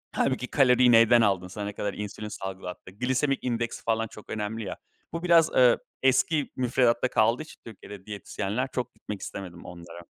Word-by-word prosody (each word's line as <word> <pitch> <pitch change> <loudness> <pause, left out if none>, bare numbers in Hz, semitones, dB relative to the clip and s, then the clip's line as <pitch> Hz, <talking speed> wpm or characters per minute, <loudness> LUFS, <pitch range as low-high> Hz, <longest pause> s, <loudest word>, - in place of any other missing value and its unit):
Hâlbuki 130 -2 0
kaloriyi 125 -3 +4
neyden 115 0 +6
aldın 95 -4 +1
sana 100 +3 -6
ne 105 - -5
kadar 100 -1 -3
insülin 105 +1 -6
salgılattı? 95 -2 -7
Glisemik 130 +6 -1
indeksi 120 -2 -2
falan 115 0 0
çok 105 - -14
önemli 110 +1 -3
ya. 100 - -6 0.4
Bu 165 +1 -4
biraz, 170 -2 +5
ııı, 125 -2 +5 0.2
eski 135 +3 +2
müfredatta 125 -1 +2
kaldığı 115 +2 +2
için - - -15
Türkiye'de 105 -3 -11
diyetisyenler 105 +3 -3
çok 125 -1 -3
gitmek 105 -2 -7
istemedim 90 -3 -8
onlara. 85 -1 -10
115 Hz, 165 wpm, -27 LUFS, 100-125 Hz, 0.4 s, neyden